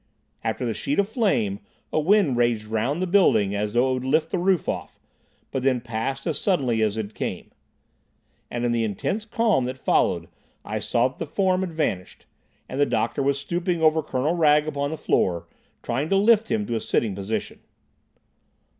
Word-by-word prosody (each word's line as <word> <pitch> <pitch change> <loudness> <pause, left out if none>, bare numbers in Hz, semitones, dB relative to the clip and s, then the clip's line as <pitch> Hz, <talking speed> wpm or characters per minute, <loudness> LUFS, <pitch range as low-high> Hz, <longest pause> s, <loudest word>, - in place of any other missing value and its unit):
After - - -2
the - - -1
sheet 280 - -2
of 200 - +3
flame, 195 - 0 0.3
a - - +3
wind 175 -4 +3
raged 120 -3 +1
round 115 +10 -1
the - - +1
building 175 - +3
as 105 +1 -2
though 125 +2 +3
it - - +1
would 130 0 -3
lift 155 +4 +1
the 185 - 0
roof 185 -1 +1
off, - - -4 0.5
but 135 - -2
then 130 -1 +2
passed 120 +4 -4
as 160 -4 0
suddenly 130 - +1
as 110 0 +1
it 110 -1 -4
came. - - -5 1.0
And 120 0 -2
in 120 - +1
the 115 -1 +1
intense 110 - -2
calm 220 - +1
that 130 +1 -4
followed - - +1 0.4
I - - -3
saw 120 +1 +1
that 130 - -20
the - - -3
form 185 -2 +1
had 180 -3 -3
vanished, 95 - -3 0.4
and 130 - -5
the 145 - +4
doctor - - 0
was 140 0 +1
stooping 170 +3 -2
over 160 0 +4
Colonel 140 +2 -1
Wragge 150 -3 +4
upon 140 -2 -2
the 160 - -4
floor, 85 - 0 0.4
trying 135 +6 -2
to 195 - +3
lift 220 +2 +4
him 220 -1 0
to 120 - -2
a 110 - -1
sitting 110 -1 0
position. 100 +3 -4
140 Hz, 190 wpm, -24 LUFS, 115-175 Hz, 1.0 s, the